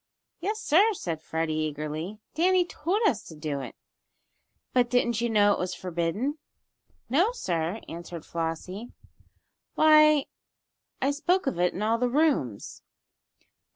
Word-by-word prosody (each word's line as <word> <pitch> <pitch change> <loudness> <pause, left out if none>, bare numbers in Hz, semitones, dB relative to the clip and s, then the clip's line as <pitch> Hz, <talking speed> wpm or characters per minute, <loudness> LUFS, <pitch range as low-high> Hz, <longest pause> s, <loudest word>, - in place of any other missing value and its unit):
"Yes! 420 +5 -2
sir," 425 +2 +4
said 165 - -4
Freddie, 160 0 -2
eagerly. 155 +5 -3 0.2
"Danny 360 +2 +3
told 360 +5 -2
us 230 - +2
to 160 - -10
do 150 -2 -3
it." - - -8 1.0
"But 245 -1 +3
didn't 240 -2 +1
you 235 - 0
know 205 -2 +4
it - - -3
was 180 0 -2
forbidden?" 185 - -2 0.7
"No, 340 - +3
sir," 175 - -2
answered 170 -1 -8
Flossie. 170 +7 -4 0.8
"Why, 305 -2 +6 0.8
I 275 - +3
spoke 350 +6 +1
of 195 -11 -2
it 180 0 +2
in 200 - -3
all 225 +2 +1
the 250 0 +1
rooms." 265 - 0
220 Hz, 135 wpm, -27 LUFS, -, 1.0 s, Why